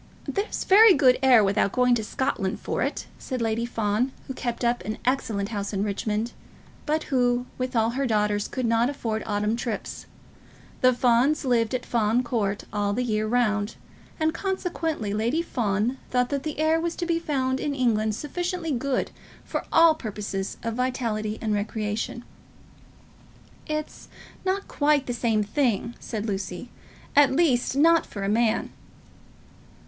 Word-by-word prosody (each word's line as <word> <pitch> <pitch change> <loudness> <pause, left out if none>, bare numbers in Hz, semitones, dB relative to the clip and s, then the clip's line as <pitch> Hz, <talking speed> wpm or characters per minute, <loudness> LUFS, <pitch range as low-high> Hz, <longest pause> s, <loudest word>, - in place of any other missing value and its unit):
"There's 405 +2 -2
very 415 +1 +7
good 260 -3 +4
air 250 -5 +6
without 200 0 +1
going 250 -1 +3
to 230 -2 +1
Scotland 215 -5 -2
for - - -3
it," - - -2
said 255 -2 -4
Lady 230 +1 -1
Fawn, 225 +2 0
who 265 - -5
kept 240 -1 -3
up 240 +1 +1
an 215 +1 -4
excellent 225 -6 0
house 205 -2 -3
at - - -1
Richmond, 210 +2 -1 0.6
but 310 +1 +1
who, 245 -1 +2
with 255 0 -3
all 225 0 +3
her 270 +2 -1
daughters, 210 -2 +1
could 255 -2 -3
not 230 +2 +2
afford 225 -6 -3
autumn 210 +1 0
trips. 230 -2 -5 0.7
The 255 - +6
Fawns 250 +4 +2
lived 235 -2 +2
at 250 - -3
Fawn 230 +1 +1
Court 210 -5 -1
all 205 -1 0
the 250 +4 0
year 215 -2 0
round, 215 -3 +1 0.4
and 315 0 +1
consequently 330 - -2
Lady 235 +10 0
Fawn 230 - -1
thought 250 -1 +1
that 280 +1 -2
air 315 +1 +2
was 340 0 -2
to 345 - -3
be 335 -1 +1
found 265 -5 -1
in 285 +1 -2
England 220 -5 +1
sufficiently 345 - -3
good 265 0 -1 0.3
for - - -3
all 330 -1 +7
purposes 210 -7 -5
of 230 - -2
vitality 230 -4 -2
and 215 -2 0
recreation. 210 +3 -3 1.4
"It's 305 0 -4 0.4
not 380 +1 -1
quite 290 -2 +2
the 245 - -3
same 225 -3 +1
thing," 235 0 0
said 215 -2 -4
Lucy; 195 +1 -4 0.4
"at 290 -1 +6
least, 265 -4 +2
not 330 +4 +4
for 200 - -6
a 195 - 0
man." 225 +1 +1
240 Hz, 155 wpm, -25 LUFS, 215-275 Hz, 1.4 s, very